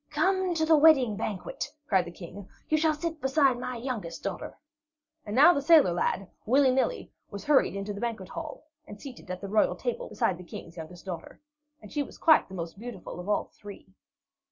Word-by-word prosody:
"Come 375 -2 +1
to 320 -1 +1
the 320 0 +5
wedding 290 -8 +5
banquet," 210 +6 -4 0.2
cried 190 -4 +3
the 170 - -8
King. 180 +3 -10 0.2
"You 310 - +3
shall 315 -1 +2
sit 320 0 -4
beside 265 -2 +3
my 250 0 -4
youngest 230 -9 -5
daughter." - - -5 0.7
And 205 - -3
now 300 +7 +8
the 280 - -1
sailor 305 - +6
lad, 185 +2 -1 0.2
willy 265 +3 +4
nilly, 265 - -1 0.2
was 200 -1 -8
hurried 290 -8 +3
into 200 +1 -4
the 200 - -7
banquet 225 -6 -3
hall, 315 -3 -7 0.2
and 205 - -10
seated 255 -7 -11
at 185 0 -5
the 200 - -5
royal 210 +2 +2
table - - -4
beside 180 -2 0
the - - -9
King's 170 0 -10
youngest 170 +2 -10
daughter. 175 -4 -7 0.4
And 210 - -12
she 295 - -1
was 285 - -7
quite 315 -1 +5
the 190 - -8
most 170 +2 -6
beautiful 220 -7 -8
of 180 +3 -7
all 210 - +2
the - - -25
three. 200 -2 -12
230 Hz, 205 wpm, -28 LUFS, 190-300 Hz, 0.7 s, now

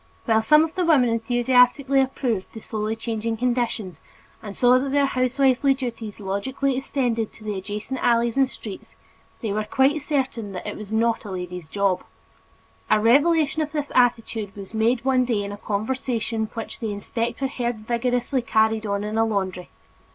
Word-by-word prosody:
While 220 -2 +3
some 300 +7 +6
of 320 0 -3
the 370 - 0
women 295 -8 +4
enthusiastically 250 +3 +3
approved 250 -6 -2
the 225 - -7
slowly 215 0 -3
changing 225 0 -3
conditions 235 -5 -1 0.4
and 205 -3 -8
saw 250 +1 +5
that 270 +1 -2
their 285 0 +3
housewifely 265 +1 +2
duties 235 -5 -6
logically 255 +8 -1
extended 245 -4 -1
to 215 - -16
the 210 -1 -3
adjacent 210 +6 -5
alleys 235 -1 +2
and 270 -1 +3
streets, 210 -6 -9 0.5
they 225 - -2
yet - - -1
were 215 +1 0
quite 270 +7 +2
certain 260 -8 -2
that 180 - -6
"it 210 - -4
was 210 -1 -9
not 230 +1 +1
a 210 - -8
lady's 180 -3 -6
job." 195 -2 0 0.9
A 215 - +4
revelation 300 +7 +3
of 305 0 -3
this 295 -2 -3
attitude 230 -4 +1
was 200 +1 -9
made 230 +3 +1
one 260 -1 +3
day 230 -5 0
in 200 - -5
a 205 - -6
conversation 225 +1 -2
which 225 - -6
the 225 -3 -3
inspector 230 +5 -3
heard 240 -5 -3
vigorously 245 +2 0
carried 220 -1 +1
on 200 0 -1
in 215 +1 -2
a - - +5
laundry. 190 -5 -2
230 Hz, 175 wpm, -23 LUFS, 215-260 Hz, 0.9 s, some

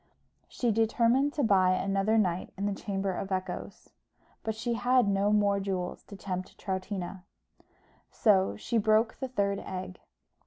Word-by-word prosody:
She 240 -2 0
determined 230 +5 +2
to 300 -3 0
buy 190 -4 +4
another 195 +3 +1
night 185 -4 0
in 200 - -2
the 205 - 0
Chamber 195 -1 -2
of 195 +2 -5
Echoes; 185 -1 -5 0.5
but 220 -1 -3
she 235 +2 -2
had 245 +1 +3
no 200 +1 +2
more 205 -1 +3
jewels 190 -2 -3
to 200 - -10
tempt 185 -2 -5
Troutina; 190 -1 -4 0.9
so 195 -4 +3
she 230 +2 0
broke 220 +1 +2
the 265 - -2
third 200 -5 0
egg. 185 -1 -6
200 Hz, 150 wpm, -29 LUFS, 190-225 Hz, 0.9 s, buy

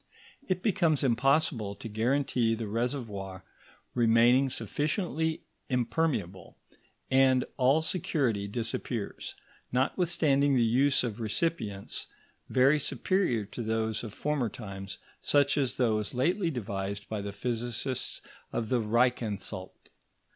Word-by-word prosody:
It 185 -1 -1
becomes 175 - +2
impossible 130 -4 +2
to 115 - -8
guarantee 120 +1 +1
the 110 -1 -4
reservoir 105 -5 -3 0.5
remaining 120 +3 +4
sufficiently 155 - -1 0.3
impermeable, 120 - -1 0.5
and 130 -1 +4
all 135 +4 +4
security 135 - 0
disappears, 115 0 -3 0.4
notwithstanding 140 0 +2
the 120 - +4
use 135 +5 +3
of 115 -2 -3
recipients 110 -3 -2 0.4
very 135 +4 +4
superior 135 - +1
to 110 +4 -7
those 110 0 -1
of 115 - -6
former 140 0 -1
times, 100 -5 -7 0.2
such 145 -1 +3
as 135 -4 0
those 110 -2 0
lately 170 - +1
devised 100 -6 -4
by 110 -2 -3
the 100 0 -4
physicists 120 +4 -2 0.3
of 115 -2 -2
the 125 -2 +2
Reichansalt. 110 -5 -1
120 Hz, 110 wpm, -29 LUFS, 110-140 Hz, 0.5 s, remaining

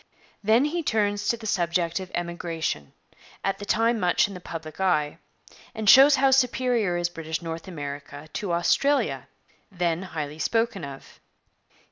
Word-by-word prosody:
Then 225 +6 +4
he 340 +3 -1
turns 205 -6 0
to 235 - +1
the 220 - -11
subject 170 -3 0
of 185 -1 -7
emigration, 170 - -3 0.5
at 195 - -1
the 205 - -6
time 230 +2 +2
much 180 +2 +3
in 200 - -9
the 180 - -8
public 165 -2 -8
eye, 155 -6 +1 0.6
and 220 -1 -4
shows 275 +6 +9
how 270 0 +3
superior 245 -7 +2
is 175 0 0
British 165 -1 -5
North 165 +2 -6
America 145 -2 -7
to 200 -4 -3
Australia, 275 +12 +1 0.4
then 175 -2 -1
highly 155 -5 -5
spoken 225 -1 0
of. 135 -1 -10
180 Hz, 150 wpm, -25 LUFS, 165-225 Hz, 0.6 s, shows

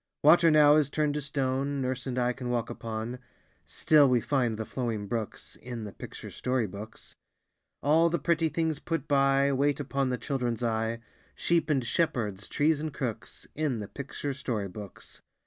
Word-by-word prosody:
Water 165 +3 +7
now 150 -1 +7
is 150 -3 +2
turned 150 0 0
to 150 - -2
stone 140 0 -1
Nurse 130 0 -2
and 125 -1 -3
I 125 0 +2
can 125 -1 -5
walk 120 -2 -1
upon; 115 +2 -5 0.5
Still 150 -3 +4
we 125 -1 +4
find 120 -3 0
the 110 - -3
flowing 115 -5 -3
brooks 110 0 -5
In 120 -2 -7
the 105 - -6
picture - - -9
story 125 -2 0
books. 105 +3 -9 0.7
All 160 +4 +4
the 170 - 0
pretty 165 -2 +1
things 160 -2 -1
put 165 -4 -3
by, 140 0 +3
Wait 140 +1 +1
upon 135 -1 -1
the 125 - -1
children's 125 -4 -2
eye, 115 0 -1 0.3
Sheep 170 -1 +1
and 135 -5 +1
shepherds, 110 - -1
trees 150 0 +2
and 155 0 -3
crooks, 125 -5 -5
In 150 -5 -1
the 105 -2 -5
picture 140 +2 -5
story 120 -7 -3
books. 100 0 -10
130 Hz, 175 wpm, -29 LUFS, 115-145 Hz, 0.7 s, Water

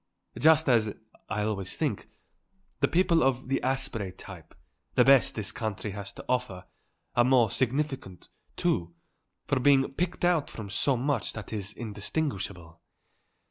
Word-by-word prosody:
Just 160 0 +5
as, 110 -5 +3 0.3
I 105 +2 -1
always 100 -3 -3
think, - - -2 0.7
the - - +3
people 170 -2 +3
of 130 -1 +1
the 135 - +1
Asprey 130 -7 -1
type, - - -12 0.4
the - - +5
best 135 -2 +5
this 110 0 -1
country 110 -3 -4
has 100 0 -6
to - - -11
offer, 125 -8 -2 0.5
are 120 - +5
more 125 -4 +4
significant, 130 - -2 0.3
too, 85 0 -1 0.5
for 135 -2 +1
being 135 +1 +4
picked 175 +3 -1
out 175 -4 +2
from 105 -3 -8
so 130 +6 +1
much 125 - -1
that 105 -1 -8
is 105 -1 -5
indistinguishable. 100 - -4
120 Hz, 140 wpm, -28 LUFS, 100-135 Hz, 0.7 s, Just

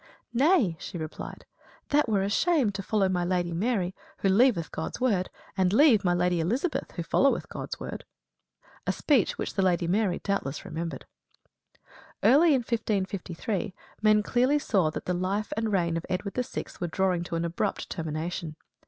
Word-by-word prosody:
"Nay," 255 - +3
she - - -6
replied, 155 -1 -7 0.4
"that 290 -4 +3
were 200 -3 +2
a - - 0
shame, 285 - +2
to 195 0 -5
follow 195 0 +1
my 180 -1 0
Lady 175 -1 0
Mary, 190 -1 0 0.2
who 195 - +1
leaveth 200 -5 +3
God's 160 - -4
word, 205 -8 +1 0.3
and 185 -2 +2
leave 225 -2 +5
my 175 -1 +2
Lady 175 0 +1
Elizabeth 245 - -1
who 170 - -4
followeth 275 +10 +2
God's - - -6
word." - - -6 0.8
A - - +3
speech 275 -9 +2
which - - -3
the 195 - 0
Lady 180 -2 +2
Mary 195 0 +1
doubtless 175 -8 -3
remembered. 165 -3 -5 1.2
Early 275 +11 +6
in 260 - +1
1553, 200 -3 -2 0.3
men 215 -1 +4
clearly 255 +6 +2
saw 195 - +1
that - - -6
the 180 - 0
life 190 +4 -1
and 225 -1 -1
reign 170 -4 +1
of 165 - -3
Edward 190 +2 -2
VI. 250 -1 -2 0.2
were 175 - -1
drawing 180 0 +1
to 170 - -4
an 165 0 -1
abrupt 170 0 -2
termination. 160 0 -4
190 Hz, 170 wpm, -27 LUFS, 175-225 Hz, 1.2 s, Early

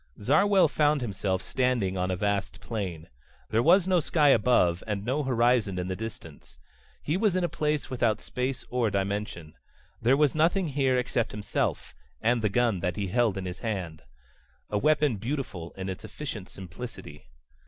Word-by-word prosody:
Zarwell 195 - +4
found 150 -1 +2
himself 95 -4 -2
standing 125 -7 0
on 90 0 -1
a 95 - 0
vast 100 +1 -1
plain. 95 -8 -5 0.4
There 110 - +3
was 175 +7 +5
no 185 -1 +3
sky 150 -1 +3
above, 90 -10 +3
and 105 -1 -3
no 135 +5 0
horizon 120 -6 +2
in 90 0 -3
the 95 - -2
distance. 85 -10 -9 0.4
He 155 +5 0
was 205 -2 +2
in 185 - +1
a - - +2
place 150 -4 -2
without 120 -4 +1
space 125 0 -3
or 125 -3 +1
dimension. 100 -5 -3 0.5
There 125 +4 +4
was 150 -2 +3
nothing 170 +3 +2
here 135 -2 +1
except 125 -2 -1
himself 105 -1 -2 0.3
and 120 +1 +2
the 105 - +1
gun 115 -2 +1
that 90 +1 -2
he 100 -3 -3
held 115 -1 +1
in 95 - -4
his 90 0 -6
hand. 90 -8 -4 0.7
A 105 - +1
weapon 150 -3 +2
beautiful 110 - -4
in 95 0 -4
its 95 -1 -5
efficient 110 -10 -7
simplicity. 90 - -9
115 Hz, 170 wpm, -27 LUFS, 95-135 Hz, 0.7 s, was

